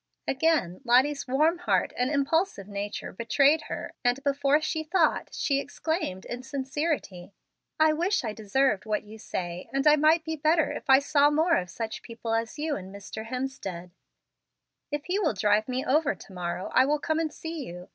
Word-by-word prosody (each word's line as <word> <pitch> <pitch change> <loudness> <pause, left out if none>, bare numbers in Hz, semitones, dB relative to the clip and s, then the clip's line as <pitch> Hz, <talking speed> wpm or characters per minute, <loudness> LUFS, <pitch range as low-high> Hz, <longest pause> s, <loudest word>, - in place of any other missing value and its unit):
Again, 270 - +1
Lottie's 265 +4 +3
warm 310 +7 +2
heart 355 - +1
and 250 +1 0
impulsive 285 - 0
nature 205 0 -5
betrayed 275 +8 +3
her, - - -5
and, 245 +2 +1
before 280 +1 +2
she 315 0 -2
thought, 325 0 +1
she 275 -1 0
exclaimed 285 - -3
in 245 +1 -5
sincerity: 265 - -3 0.5
"I 310 0 +5
wish 350 +4 0
I 220 -3 -3
deserved 220 +1 0
what 215 0 0
you 215 +1 -12
say, 175 -3 -5
and 275 0 -1
I 300 0 +7
might 315 +2 +4
be 320 -1 -2
better 315 +1 +2
if - - -7
I 265 - +9
saw 285 +1 +3
more 320 +3 +3
of 180 -1 -1
such 220 +3 -5
people 230 -1 -5
as 225 +3 -1
you 305 0 -1
and 190 -1 -8
Mr. 200 +2 -8
Hemstead. 225 -9 -5 1.0
If 295 0 -3
he 375 +3 0
will 315 - +1
drive 210 +2 +2
me 255 0 -2
over 290 +2 +2
to 195 - -14
morrow, 180 +1 -4
I 255 - +6
will 300 +1 +2
come 315 +2 -1
and 320 -2 -1
see 325 -1 -6
you. 180 +1 -9
275 Hz, 185 wpm, -27 LUFS, 215-310 Hz, 1.0 s, I